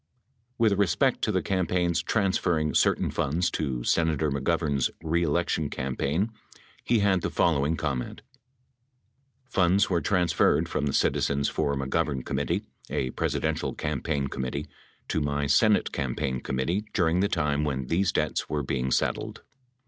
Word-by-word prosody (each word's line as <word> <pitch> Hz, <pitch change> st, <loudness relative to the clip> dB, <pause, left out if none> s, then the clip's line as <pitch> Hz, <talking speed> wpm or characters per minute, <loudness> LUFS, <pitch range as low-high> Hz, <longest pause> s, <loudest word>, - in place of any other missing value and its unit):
With 110 Hz, -4 st, +2 dB
respect 90 Hz, -7 st, +2 dB
to -, -, 0 dB
the -, -, 0 dB
campaign's 90 Hz, -2 st, 0 dB
transferring 90 Hz, -7 st, +1 dB
certain -, -, +2 dB
funds 85 Hz, +6 st, 0 dB
to 65 Hz, -6 st, -2 dB
Sena 80 Hz, +3 st, +2 dB
tor 75 Hz, 0 st, 0 dB
McGovern's 70 Hz, 0 st, 0 dB
reelection 80 Hz, -1 st, 0 dB
campaign, 70 Hz, -, -1 dB, 0.5 s
he 115 Hz, -3 st, +2 dB
had 95 Hz, -3 st, +3 dB
the -, -, -1 dB
following 80 Hz, -1 st, +1 dB
comment 65 Hz, -6 st, -3 dB, 1.2 s
Funds 95 Hz, -6 st, +2 dB
were 85 Hz, -2 st, +2 dB
transferred 90 Hz, -2 st, +2 dB
from 75 Hz, -, -1 dB
the 70 Hz, -, -1 dB
Citizens 70 Hz, 0 st, +1 dB
for 70 Hz, 0 st, -1 dB
McGovern 70 Hz, 0 st, -1 dB
Committee, -, -, -1 dB, 0.3 s
a 65 Hz, -, -1 dB
Presidential -, -, -1 dB
campaign 70 Hz, -1 st, -2 dB
committee, 65 Hz, +3 st, -4 dB, 0.4 s
to 80 Hz, -, -1 dB
my 70 Hz, 0 st, -1 dB
Senate 100 Hz, +10 st, +3 dB
campaign 65 Hz, -1 st, -2 dB
committee 80 Hz, +11 st, -1 dB
during 85 Hz, -2 st, +2 dB
the 100 Hz, +2 st, +2 dB
time 75 Hz, -3 st, 0 dB
when 65 Hz, -3 st, -2 dB
these 90 Hz, +6 st, +1 dB
debts -, -, -1 dB
were 75 Hz, -1 st, -1 dB
being 65 Hz, -1 st, -1 dB
settled. -, -, -1 dB
80 Hz, 140 wpm, -27 LUFS, 70-90 Hz, 1.2 s, had